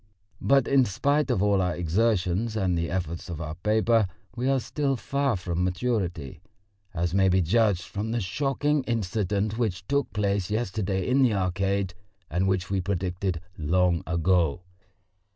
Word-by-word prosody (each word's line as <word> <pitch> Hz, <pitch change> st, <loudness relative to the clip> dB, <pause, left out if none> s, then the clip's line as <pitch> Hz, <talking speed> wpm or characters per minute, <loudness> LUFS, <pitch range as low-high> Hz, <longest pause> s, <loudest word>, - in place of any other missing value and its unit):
But 135 Hz, -2 st, +3 dB
in 140 Hz, -1 st, +5 dB
spite 140 Hz, +8 st, +1 dB
of 100 Hz, -6 st, +1 dB
all 100 Hz, -2 st, +3 dB
our 90 Hz, -1 st, 0 dB
exertions 95 Hz, +3 st, 0 dB
and 95 Hz, -4 st, +1 dB
the 85 Hz, 0 st, -1 dB
efforts 85 Hz, -1 st, -3 dB
of 85 Hz, -3 st, -5 dB
our 75 Hz, -2 st, -4 dB
paper 110 Hz, +4 st, +2 dB, 0.3 s
we 125 Hz, +2 st, -1 dB
are 135 Hz, -1 st, +3 dB
still 140 Hz, +1 st, -1 dB
far 140 Hz, -1 st, 0 dB
from 90 Hz, -1 st, -2 dB
maturity, 90 Hz, -, -2 dB, 0.5 s
as 85 Hz, 0 st, -2 dB
may 95 Hz, 0 st, +4 dB
be 95 Hz, +1 st, +3 dB
judged 100 Hz, +1 st, +2 dB
from 105 Hz, +4 st, -4 dB
the 120 Hz, +1 st, 0 dB
shocking 140 Hz, +8 st, 0 dB
incident 105 Hz, -1 st, -1 dB
which 100 Hz, -5 st, -1 dB
took 140 Hz, 0 st, 0 dB
place 100 Hz, -3 st, 0 dB
yesterday 100 Hz, -3 st, -1 dB
in 130 Hz, +2 st, +3 dB
the 120 Hz, -5 st, +3 dB
Arcade 95 Hz, 0 st, 0 dB, 0.4 s
and 95 Hz, +2 st, +1 dB
which 95 Hz, -1 st, 0 dB
we 95 Hz, -1 st, +1 dB
predicted 90 Hz, -1 st, -2 dB, 0.2 s
long 85 Hz, +2 st, +2 dB
ago. 85 Hz, -1 st, +1 dB
95 Hz, 155 wpm, -26 LUFS, 90-115 Hz, 0.5 s, in